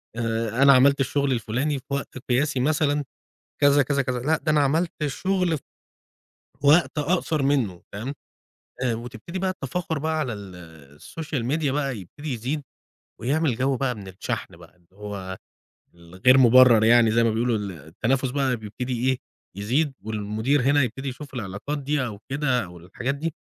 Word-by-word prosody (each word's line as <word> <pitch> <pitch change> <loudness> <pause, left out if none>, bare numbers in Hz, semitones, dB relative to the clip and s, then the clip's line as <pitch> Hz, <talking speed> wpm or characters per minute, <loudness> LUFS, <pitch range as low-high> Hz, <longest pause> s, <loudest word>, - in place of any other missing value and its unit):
آآ، 115 +1 -1
أنا 140 0 +8
عملت 140 +2 +5
الشغل 140 +1 +1
الفلاني 130 +5 -1
في 130 - -23
وقت 140 -1 -4
قياسي 135 +2 +1
مثلًا 145 +1 +1 0.6
كذا 145 0 +5
كذا 140 +1 +1
كذا. 125 -2 -2
لأ، 155 +6 +1
ده 155 - -1
أنا 150 -1 +4
عملت 160 +5 +1 0.2
شغل 180 +2 0
في - - -17 1.0
وقت 155 +3 +4
أقصر 155 -1 0
منه. 130 -11 0
تمام؟ 120 +8 -5 0.7
آآ، 125 -3 +1
وتبتدي 120 +9 -7
بقى 190 0 0
التفاخر 165 -1 -3
بقى 160 +2 -1
على 130 -6 -2
ال 85 -8 -11
الSocial 155 -5 -5
Media 155 -2 +1
بقى 135 -3 -1
يبتدي 140 - -7
يزيد، 130 +6 -3 0.6
ويعمل 140 +1 +1
جو 130 +1 +1
بقى 125 -1 -1
من 100 -3 -10
الشحن 95 -2 -5
بقى 85 0 -17
اللي 85 -1 -32
هو 100 -2 -6 0.6
ال 85 +1 -16
غير 125 +8 +5
مبرر 125 -2 +7
يعني 115 0 +5
زي 115 +1 +3
ما 115 - +3
بيقولوا، 115 +1 +1
ال 100 -2 -4
التنافس 100 - -2
بقى 135 -2 +1
بيبتدي 120 +4 -3
إيه؟ 130 - +1 0.4
يزيد، 130 +9 0
والمدير 110 +6 0
هنا 145 +2 +3
يبتدي 135 +3 -3
يشوف 140 +3 -9
العلاقات 105 +5 -4
دي 140 -1 -1
أو 105 -4 -6
كده 135 -3 +1
أو 90 0 -12
الحاجات 105 +11 -4
دي، 160 +2 -3
130 Hz, 170 wpm, -24 LUFS, 110-145 Hz, 1.0 s, أنا